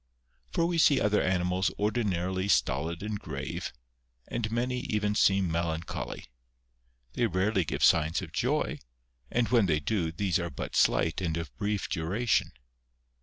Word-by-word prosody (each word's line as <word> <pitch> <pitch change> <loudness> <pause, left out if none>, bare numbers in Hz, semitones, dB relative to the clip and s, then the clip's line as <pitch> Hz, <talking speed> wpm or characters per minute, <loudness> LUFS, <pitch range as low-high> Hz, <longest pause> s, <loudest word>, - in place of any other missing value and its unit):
For 165 - +1
we 170 -1 0
see 145 -3 +5
other 105 0 +2
animals 90 0 +1
ordinarily 95 -4 0
stolid 85 0 +1
and 105 -1 -3
grave, - - -5 0.6
and 110 -2 -2
many 125 +2 -1
even 105 -5 -1
seem 95 -4 +3
melancholy. 85 0 -3 0.9
They 120 +5 +1
rarely 95 +1 +1
give - - -2
signs 80 +2 +4
of - - -8
joy, - - 0 0.5
and 120 -1 +1
when 115 -5 +4
they 75 -3 +2
do, 85 0 -1
these 90 +1 0
are 85 -1 -3
but 70 - -6
slight 80 +3 +2
and 85 -3 -1
of 85 - -6
brief 105 -1 -2
duration. 100 +9 0
95 Hz, 145 wpm, -29 LUFS, 85-110 Hz, 0.9 s, see